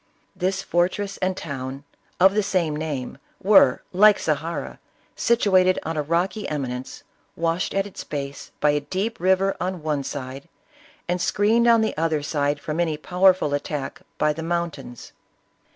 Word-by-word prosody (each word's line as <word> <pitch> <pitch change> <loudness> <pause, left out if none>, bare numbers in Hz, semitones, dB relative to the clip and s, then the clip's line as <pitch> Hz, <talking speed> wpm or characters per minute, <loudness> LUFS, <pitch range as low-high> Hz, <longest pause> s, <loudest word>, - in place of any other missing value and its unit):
This 190 +1 -1
fortress 195 +3 0
and 185 0 -1
town, 135 -3 -6 0.4
of 190 +2 +6
the 210 - +2
same 175 -6 0
name, 150 -5 -4 0.2
were, 190 -10 +5
like 210 +3 +6
Zahara, 160 +2 -3 0.4
situated 190 -6 +3
on 160 +1 -3
a 150 - 0
rocky 175 +8 -1
emi 140 -4 -2
nence, 125 +1 -7 0.3
washed 165 +3 -1
at 195 0 +1
its 200 - -8
base 140 -1 -6
by 150 - +4
a 145 - +1
deep 195 +10 -3
river 190 +2 +2
on 180 -3 -3
one 150 -3 -1
side, 135 0 -7 0.6
and 175 0 -1
screened 220 +5 +2
on 230 -1 +6
the 220 - 0
other 160 -2 0
side 145 -1 0
from 155 +2 -4
any 160 -3 0
powerful 180 -2 +3
at 145 - -1
tack 145 -3 -5 0.2
by 150 0 +2
the 160 - -6
mountains. 165 -7 -4
170 Hz, 160 wpm, -23 LUFS, 145-190 Hz, 0.6 s, of